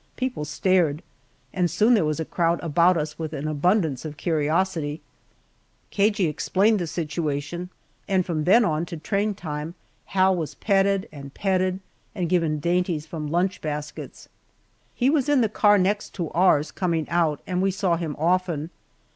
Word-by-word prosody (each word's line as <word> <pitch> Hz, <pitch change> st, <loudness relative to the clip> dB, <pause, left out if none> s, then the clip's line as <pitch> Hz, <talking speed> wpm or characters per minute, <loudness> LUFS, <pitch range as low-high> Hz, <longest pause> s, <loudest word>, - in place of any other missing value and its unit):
People 255 Hz, -11 st, -3 dB
stared, 165 Hz, -1 st, +1 dB, 0.5 s
and 180 Hz, -2 st, +1 dB
soon 215 Hz, +8 st, +3 dB
there 215 Hz, -, +4 dB
was 155 Hz, 0 st, -1 dB
a 160 Hz, -, -2 dB
crowd 170 Hz, +1 st, 0 dB
about 170 Hz, +2 st, +3 dB
us 150 Hz, 0 st, -4 dB
with 160 Hz, -1 st, -4 dB
an 150 Hz, 0 st, -4 dB
abundance 155 Hz, -, +1 dB
of 155 Hz, -2 st, -7 dB
curiosity. 160 Hz, -1 st, 0 dB, 0.9 s
Cagey 205 Hz, -2 st, +2 dB
explained 195 Hz, +7 st, +1 dB
the 175 Hz, -, -2 dB
situation, 155 Hz, +1 st, -3 dB, 0.4 s
and 190 Hz, -3 st, +1 dB
from 155 Hz, -4 st, -2 dB
then 225 Hz, +5 st, +5 dB
on 155 Hz, -3 st, 0 dB
to 170 Hz, -, -6 dB
train 200 Hz, +5 st, -1 dB
time, 155 Hz, -2 st, -5 dB, 0.3 s
Hal 190 Hz, 0 st, +2 dB
was 155 Hz, -4 st, -4 dB
patted 195 Hz, -1 st, +1 dB
and 140 Hz, -2 st, -10 dB
petted 185 Hz, -1 st, 0 dB, 0.3 s
and 175 Hz, -3 st, -2 dB
given 165 Hz, -4 st, +1 dB
dainties 175 Hz, -1 st, 0 dB
from 155 Hz, -3 st, -5 dB
lunch 175 Hz, +5 st, 0 dB
baskets. 150 Hz, -1 st, -6 dB, 0.7 s
He 260 Hz, +2 st, +2 dB
was 290 Hz, -3 st, +1 dB
in 285 Hz, -3 st, +4 dB
the 225 Hz, -, +3 dB
car 205 Hz, 0 st, +4 dB
next 200 Hz, +2 st, 0 dB
to 170 Hz, -5 st, -3 dB
ours, 155 Hz, -4 st, +3 dB
coming 170 Hz, -4 st, -1 dB
out, 165 Hz, -4 st, +1 dB
and 180 Hz, -1 st, -1 dB
we 195 Hz, -, +2 dB
saw 190 Hz, -2 st, 0 dB
him 165 Hz, -3 st, -4 dB
often. 170 Hz, -1 st, 0 dB
175 Hz, 165 wpm, -24 LUFS, 155-190 Hz, 0.9 s, then